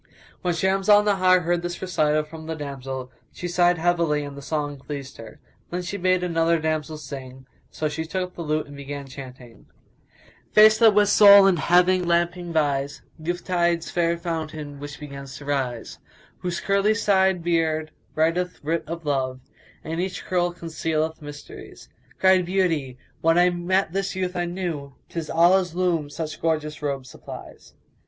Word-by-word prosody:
When 175 -2 0
Shams 190 +3 0
Al 205 0 +7
Nahar 185 -3 +3
heard 175 +1 0
this 175 0 -5
recital 155 -4 +1
from 160 +1 -11
the 160 - -3
damsel, 135 -3 -6 0.2
she 175 - -6
sighed 175 0 +3
heavily 165 -3 +1
and 145 -1 -7
the 140 - -9
song 145 -1 -3
pleased 140 -1 -7
her. 110 -1 -11 0.3
Then 180 +1 -3
she 180 - -5
bade 185 -1 +1
another 165 -1 +2
damsel 155 -1 -2
sing; 130 -2 -9 0.2
so 155 - -2
she 155 +2 -4
took 180 +2 -3
the - - -8
lute 155 -1 -1
and 145 - -12
began 140 0 -7
chanting, 130 -3 -12 0.9
"Face 215 0 +7
that 225 -3 +6
with 205 -1 +4
Sol 200 -1 +9
in 190 -2 +4
Heaven 180 +2 +3
lamping 175 0 0
vies; 140 -3 -1
* - - -32
Youth 175 +2 -3
tide's 170 -2 0
fair 170 -1 +1
fountain 155 -4 -5
which 145 +1 -8
begins 140 -2 -8
to 145 - -11
rise; 130 -5 -3 0.4
Whose 175 -1 -3
curly 200 +2 +2
side 190 -4 +2
beard 160 -2 0 0.2
writeth 170 +3 0
writ 165 +3 -1
of 165 0 -6
love, 130 -3 -1 0.2
* - - -28
And 160 - -5
in 165 - -2
each 185 +1 -3
curl 175 -1 +1
concealeth 160 -1 -3
mysteries: 145 0 -11 0.3
Cried 190 -1 +5
Beauty, 165 -9 0 0.2
'When 165 +1 +3
I 180 0 +5
met 175 0 0
this 195 0 -2
youth 185 -1 -2
I 175 0 0
knew 170 -6 -4
* - - -41
'Tis 165 -2 -5
Allah's 175 +1 +3
loom 175 -5 0
such 155 +1 -6
gorgeous 155 -2 -1
robe 140 -3 -3
supplies.'" - - -11
165 Hz, 175 wpm, -24 LUFS, 145-180 Hz, 0.9 s, Sol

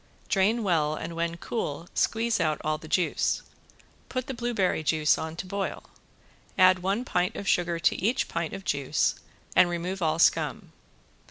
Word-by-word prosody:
Drain 215 +4 +2
well 155 -6 +1
and 165 +2 -6
when 170 0 -2
cool 170 -5 -4
squeeze 230 0 +1
out 155 -2 +1
all 155 0 -1
the 155 - -11
juice. 180 +2 +1 0.7
Put 255 -1 -2
the 270 - -5
blueberry 235 -9 0
juice 155 0 +3
on 160 0 -5
to 170 - -5
boil, 195 +1 -3 0.7
add 185 -1 +6
one 195 +7 -1
pint 180 -6 0
of 200 - -6
sugar 170 -1 +2
to 165 - +1
each 235 +5 +1
pint 170 -1 -3
of 195 - -9
juice 140 -2 +1 0.4
and 180 -1 +6
remove 175 +2 -3
all 160 -1 +1
scum. - - +2
180 Hz, 165 wpm, -27 LUFS, 160-200 Hz, 0.7 s, add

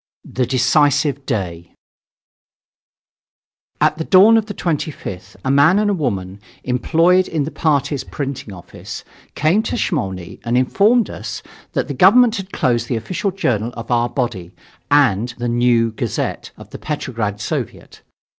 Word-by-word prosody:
THE 125 -1 -2
DECISIVE 140 +2 +2
DAY 85 -8 -4 2.0
At 155 - +2
the - - -1
dawn 200 +6 +6
of 220 -1 +1
the 205 - -6
25th, 120 - -4
a 130 - +1
man 145 +7 +5
and 205 -3 +1
woman, 95 -8 -3 0.2
employed 165 +8 +2
in 155 -3 -1
the 155 - -5
party's 145 -3 0
printing 135 -6 -5
office, 90 -3 -9 0.3
came 160 +8 +2
to 225 - -3
Smolny 95 - -3
and 120 +1 0
informed 205 - +3
us - - -7 0.3
that - - -1
the - - -4
government 245 -2 +5
had 195 -1 -7
closed 120 -4 0
the 120 - -1
official 180 - -2
journal 120 - -1
of 115 +1 -7
our 120 0 +2
body 110 -10 -4 0.3
and 120 -5 +2
the 120 0 -3
"New 120 -1 +2
Gazette" 110 - -3
of - - -14
the - - -8
Petrograd 115 -9 -3
Soviet. 105 - -5
130 Hz, 145 wpm, -19 LUFS, 115-165 Hz, 2.0 s, dawn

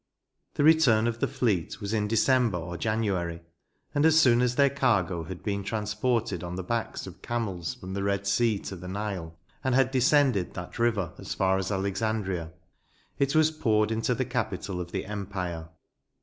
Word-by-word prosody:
The - - +1
return 145 -8 +5
of 115 0 -1
the - - +1
fleet 120 -12 -1
was 100 0 -4
in 105 -2 +1
December 115 -2 +3
or 85 +1 -5
January, 95 -6 -1 0.5
and 145 - +2
as 160 0 +6
soon 120 -5 +5
as 125 0 +1
their 140 0 +4
cargo 95 -11 +1
had 90 +1 -8
been 100 -2 -2
transported 110 -1 -1
on 90 0 -5
the 95 - -4
backs 115 +4 -3
of 95 -1 -11
camels 100 -8 -3
from 95 0 -8
the 100 - -2
Red 100 0 0
Sea 110 +1 +2
to 95 - -5
the 90 0 -9
Nile, 95 -4 -4 0.3
and 130 -1 +1
had 130 -1 +3
descended 130 -6 +3
that 90 +6 -7
river 110 -8 +1
as - - -5
far 95 0 +2
as 95 +1 -3
Alexandria, 95 -3 -1 0.7
112 - - -32
NOTES. 140 +1 +1
it 155 0 +4
waa 155 - -20
poured 110 -2 +3
into 115 +2 0
the 130 - -1
capital 100 -6 -3
of 85 0 -7
the - - -3
empire. 95 -5 -5
105 Hz, 190 wpm, -27 LUFS, 95-120 Hz, 0.7 s, as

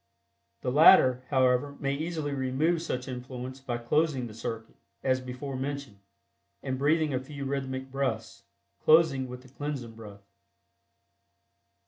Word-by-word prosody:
The 125 - -1
latter, 130 -4 +7
however, 130 +1 +2
may 140 0 0
easily 155 -1 -3
remove 140 +6 +1
such 125 -6 -3
influence 130 0 -6
by 130 -3 -3
closing 135 +2 +1
the 110 - -8
circuit 115 0 -6 0.3
(as 130 -1 +2
before 130 +2 -6
mentioned) 135 -5 -5 0.6
and 130 -1 -2
breathing 155 +1 +2
a 130 - +1
few 140 +1 -7
rhythmic 135 -1 -3
breaths, 120 -5 -2 0.4
closing 155 -5 +5
with 125 0 -9
the 130 - -16
Cleansing 135 -3 -5
Breath. 105 -3 -12
130 Hz, 130 wpm, -29 LUFS, 125-145 Hz, 0.6 s, latter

